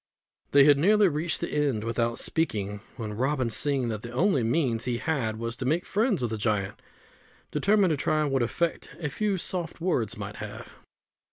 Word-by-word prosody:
They 140 0 +6
had 145 -1 +6
nearly 205 +5 +5
reached 160 +1 -1
the - - -3
end 140 -8 0
without 115 0 -1
speaking, 105 -11 -2 0.2
when 110 -4 -4
Robin, 130 +1 0
seeing 135 0 0
that 110 -2 -3
the 120 - -7
only 140 +4 +2
means 120 -1 +1
he 125 -2 0
had 125 -7 -1
was 115 +1 -3
to 130 - -4
make 160 +7 +1
friends 205 - +1
with 120 - -1
the 110 - -3
giant, 105 -2 -1 0.7
determined 200 -3 +3
to 155 - +1
try 155 +2 +1
what 135 -2 +1
effect 165 +8 -1
a 155 -3 -2
few 200 +6 -1
soft 175 -2 -4
words 120 - 0
might 105 0 -6
have. 105 -1 -8
135 Hz, 185 wpm, -27 LUFS, 115-165 Hz, 0.7 s, They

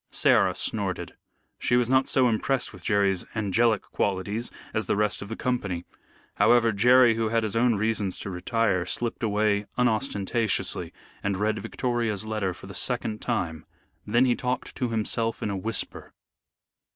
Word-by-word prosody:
Sarah - - +3
snorted. - - -2 0.5
She 120 - +1
was 125 -1 +3
not 130 +1 +3
so 130 -2 +3
impressed 125 +3 0
with 95 -3 -13
Jerry's 100 -3 +2
angelic 110 +1 +2
qualities 100 +4 -2 0.2
as 110 - -1
the - - +1
rest 105 -2 0
of 100 - -7
the 115 - -4
company. 100 -10 -2 0.5
However, 120 -1 +5
Jerry, 120 +3 +5
who 110 -1 -1
had 115 0 +1
his 110 0 -2
own 120 0 +3
reasons 105 -2 -1
to 100 - -6
retire, 95 0 0
slipped 120 +3 -2
away 105 -1 +1
unostentatiously 110 -2 0 0.3
and 100 -1 -1
read 105 +2 0
Victoria's 115 -5 -2
letter 110 -3 -1
for 90 - -11
the 100 - -9
second 110 +1 -1
time. 80 -3 -2 0.4
Then 120 +5 +4
he 125 -2 +3
talked 125 0 -3
to 125 - -1
himself 115 0 -1
in 105 - -1
a - - -2
whisper. 110 +4 -4
110 Hz, 160 wpm, -26 LUFS, 100-120 Hz, 0.5 s, However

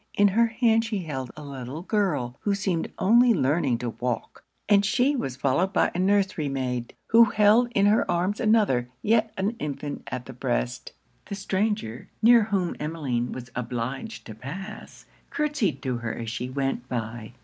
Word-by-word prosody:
In 205 0 +5
her 230 +4 +3
hand 225 0 +2
she 210 -4 -3
held 135 -5 -4
a 150 - -8
little 140 +2 -7
girl, 185 - 0
who 205 -1 0
seemed 190 -4 -2
only 235 +4 +5
learning 140 -3 +1
to 120 -1 -3
walk; 120 0 -4 0.2
and 205 -1 +5
she 255 +8 +2
was 135 - -3
followed 140 +9 +1
by - - +2
a 175 - -3
nursery 190 -5 +1
maid, 125 -3 -3
who 230 +1 +8
held 215 +3 +4
in 200 - +4
her 210 +2 +3
arms 180 +4 0
another, 210 - +2
yet 225 0 +2
an 195 +3 0
infant 145 0 -4
at 125 -1 -5
the - - -9
breast. - - -2 0.3
The 200 - -4
stranger, 195 - -2
near 230 -1 +6
whom 195 -5 -1
Emmeline 140 -6 -2
was 125 -1 -8
obliged 125 - -4
to 110 - -8
pass, 185 - -9 0.2
curtsyed 295 - -1
to 130 -3 -1
her 120 -2 -4
as 115 -1 -5
she 120 +2 -4
went 135 -2 -2
by. 115 -1 -5
170 Hz, 170 wpm, -26 LUFS, 125-210 Hz, 0.3 s, who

